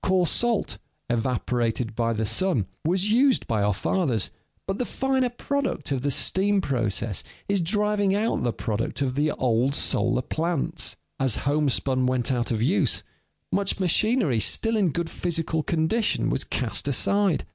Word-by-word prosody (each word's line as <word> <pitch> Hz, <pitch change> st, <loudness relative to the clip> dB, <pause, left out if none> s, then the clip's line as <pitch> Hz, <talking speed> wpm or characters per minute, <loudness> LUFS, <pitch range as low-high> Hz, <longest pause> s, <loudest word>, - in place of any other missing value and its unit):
Coarse 185 Hz, -2 st, +2 dB
salt, 225 Hz, -, 0 dB, 0.3 s
evaporated 120 Hz, -1 st, -1 dB
by 115 Hz, 0 st, 0 dB
the 110 Hz, -1 st, -1 dB
sun, 115 Hz, -, +2 dB, 0.2 s
was 185 Hz, +5 st, +1 dB
used 260 Hz, +3 st, +3 dB
by 110 Hz, -3 st, 0 dB
our 105 Hz, +1 st, +2 dB
fathers, 120 Hz, -, 0 dB, 0.3 s
but 195 Hz, 0 st, -3 dB
the -, -, +1 dB
finer 265 Hz, 0 st, 0 dB
product 260 Hz, -, -2 dB
of 135 Hz, -2 st, 0 dB
the 145 Hz, -, 0 dB
steam 195 Hz, +8 st, +2 dB
process 115 Hz, -, -1 dB, 0.2 s
is 200 Hz, -2 st, +1 dB
driving 205 Hz, +2 st, +1 dB
out 220 Hz, +3 st, 0 dB
the 120 Hz, -, +1 dB
product 115 Hz, +4 st, -2 dB
of 130 Hz, -2 st, -1 dB
the 145 Hz, +3 st, +1 dB
old 125 Hz, +2 st, +1 dB
solar 120 Hz, 0 st, +1 dB
plants. 165 Hz, +2 st, -1 dB, 0.2 s
As 130 Hz, -4 st, +1 dB
homespun 135 Hz, -3 st, +1 dB
went 130 Hz, 0 st, 0 dB
out 120 Hz, -2 st, 0 dB
of 115 Hz, -2 st, 0 dB
use, 165 Hz, +11 st, +2 dB, 0.5 s
much 200 Hz, 0 st, 0 dB
machinery 185 Hz, -, +2 dB
still 225 Hz, -, +1 dB
in 200 Hz, -5 st, +2 dB
good 170 Hz, +2 st, -2 dB
physical 165 Hz, -2 st, -1 dB
condition 170 Hz, +9 st, 0 dB
was -, -, 0 dB
cast -, -, -1 dB
aside. 200 Hz, -6 st, +2 dB
155 Hz, 155 wpm, -25 LUFS, 120-200 Hz, 0.5 s, used